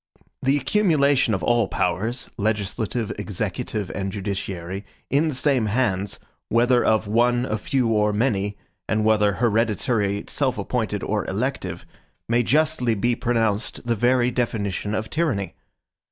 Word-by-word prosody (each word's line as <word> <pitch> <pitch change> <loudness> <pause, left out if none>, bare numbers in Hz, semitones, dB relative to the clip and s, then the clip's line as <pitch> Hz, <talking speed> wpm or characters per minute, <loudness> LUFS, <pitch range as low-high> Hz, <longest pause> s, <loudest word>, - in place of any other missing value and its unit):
The 135 +2 +3
accumulation 140 - +3
of - - -4
all 120 -3 +3
powers, 105 +10 -1
legislative, 110 +2 -1
executive, 105 -1 -3
and 95 +1 -3
judiciary, 95 -2 -4 0.3
in 145 +4 +3
the 150 - -1
same 130 -4 +2
hands, 105 -4 0 0.3
whether 120 +2 +3
of 110 0 +2
one, 120 +3 +2
a 110 -3 -2
few, 130 +2 0
or 105 -1 +2
many, 105 -3 0 0.3
and 110 0 +1
whether 105 -2 +3
hereditary, 110 -1 +1
self - - -1
appointed, - - -2
or - - -1
elective, - - -3 0.4
may 120 +1 +3
justly 140 -2 +2
be 120 +4 +1
pronounced 115 -2 -1
the 120 - +2
very 120 +2 +2
definition 105 -4 -1
of 110 0 -2
tyranny. 145 - -1
110 Hz, 135 wpm, -23 LUFS, 105-125 Hz, 0.4 s, The